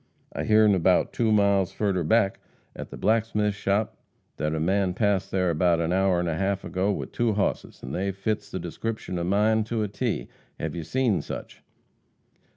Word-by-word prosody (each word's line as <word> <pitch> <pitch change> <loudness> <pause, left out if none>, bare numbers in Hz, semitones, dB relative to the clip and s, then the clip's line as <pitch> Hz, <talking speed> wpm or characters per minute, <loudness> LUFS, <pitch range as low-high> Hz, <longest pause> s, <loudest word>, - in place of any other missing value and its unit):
I - - -3
hearn 110 -1 +5
about 90 0 +2
two 115 -2 +1
miles 100 -3 +3
furder 95 -4 0
back 100 +3 +2 0.4
at - - -7
the - - -9
blacksmith's 105 -2 +1
shop 105 +1 0 0.4
that 75 +1 -1
er 80 - -1
man 95 +2 +1
passed 100 -3 +1
there 90 -2 +1
about 85 +1 +2
a 85 +1 0
hour 95 -1 +3
an' 85 0 0
a 80 - -1
half 100 0 0
ago 95 +3 0
with - - -4
two 120 -2 +1
hosses, 100 - -2
an' 65 - -6
they 95 +5 -1
fits 105 +3 -3
the 95 - -4
descripshun 90 +2 -4
of 85 - -2
mine 110 +3 +3
to 110 -1 -1
a - - -1
T. 100 - -2 0.3
Hev - - -3
you 85 - -4
seen 120 +3 +1
sich?" - - -8
100 Hz, 190 wpm, -26 LUFS, 90-110 Hz, 0.4 s, hearn